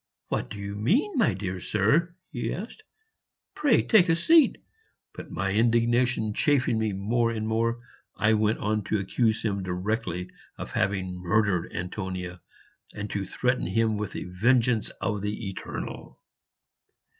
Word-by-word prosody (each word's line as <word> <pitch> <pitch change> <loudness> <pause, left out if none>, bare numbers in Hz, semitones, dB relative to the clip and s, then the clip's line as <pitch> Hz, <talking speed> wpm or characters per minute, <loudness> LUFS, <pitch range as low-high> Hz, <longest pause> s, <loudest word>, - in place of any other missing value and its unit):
"What - - -2
do - - -7
you 100 0 -5
mean, 210 - +1
my 235 -6 +3
dear 95 -2 -4
sir?" 145 - +1 0.2
he 120 -6 -3
asked; 225 - -6 0.7
"pray 285 -6 +3
take 190 -6 +5
a 165 - +5
seat." 315 - +5 0.6
But - - -9
my 95 0 -2
indignation 120 0 +2
chafing 130 -3 +2
me 110 -1 0
more 115 +5 0
and 110 -1 -3
more, 115 +1 0 0.4
I 110 +1 +3
went 110 0 +2
on 105 0 -1
to 110 - 0
accuse 110 +3 0
him 100 -3 -1
directly 90 0 -3 0.3
of - - -7
having 95 -2 -1
murdered 95 -1 +1
Antonia, 90 -1 -5 0.5
and 105 -1 -5
to 100 -2 -3
threaten 125 +4 0
him 110 +3 +1
with 105 -2 -4
the - - -4
vengeance 115 +4 +2
of 105 -2 -1
the 105 0 -3
Eternal. - - -7
110 Hz, 145 wpm, -27 LUFS, 100-120 Hz, 0.7 s, take